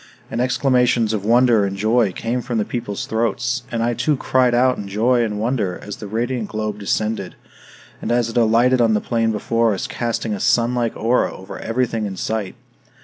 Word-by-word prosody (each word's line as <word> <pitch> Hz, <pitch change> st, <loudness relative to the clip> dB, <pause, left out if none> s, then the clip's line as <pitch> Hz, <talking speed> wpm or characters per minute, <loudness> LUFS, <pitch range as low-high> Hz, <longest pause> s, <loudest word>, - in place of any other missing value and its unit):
And 115 Hz, -, -1 dB
exclamations 125 Hz, -3 st, +2 dB
of 105 Hz, -3 st, -2 dB
wonder 120 Hz, 0 st, +4 dB
and 100 Hz, 0 st, -2 dB
joy 110 Hz, 0 st, +2 dB
came 115 Hz, +6 st, -2 dB
from 120 Hz, -1 st, -3 dB
the 105 Hz, -, 0 dB
people's 110 Hz, -5 st, -4 dB
throats; 120 Hz, +3 st, -1 dB
and 115 Hz, -1 st, -1 dB
I 120 Hz, +1 st, +1 dB
too 150 Hz, +4 st, 0 dB
cried 130 Hz, -2 st, +2 dB
out 125 Hz, +1 st, +3 dB
in 100 Hz, -, -6 dB
joy 120 Hz, +5 st, +2 dB
and 105 Hz, -2 st, -2 dB
wonder 110 Hz, -5 st, -1 dB
as 105 Hz, -, -7 dB
the 105 Hz, -, -8 dB
radiant 115 Hz, +2 st, -2 dB
globe 110 Hz, -1 st, -3 dB
descended, 105 Hz, -1 st, -2 dB, 0.7 s
and -, -, -3 dB
as 120 Hz, -1 st, +2 dB
it 115 Hz, -, -7 dB
alighted 120 Hz, +2 st, +4 dB
on 115 Hz, -2 st, +3 dB
the -, -, +2 dB
plain 115 Hz, 0 st, 0 dB
before 115 Hz, 0 st, +1 dB
us, -, -, -4 dB
casting 115 Hz, -2 st, -2 dB
a 100 Hz, -, -4 dB
sunlike 120 Hz, +1 st, +1 dB
aura 120 Hz, +3 st, +1 dB
over 95 Hz, -, -9 dB
everything 115 Hz, -2 st, -1 dB
in 95 Hz, -2 st, -6 dB
sight. 110 Hz, -1 st, -3 dB
115 Hz, 195 wpm, -20 LUFS, 105-120 Hz, 0.7 s, wonder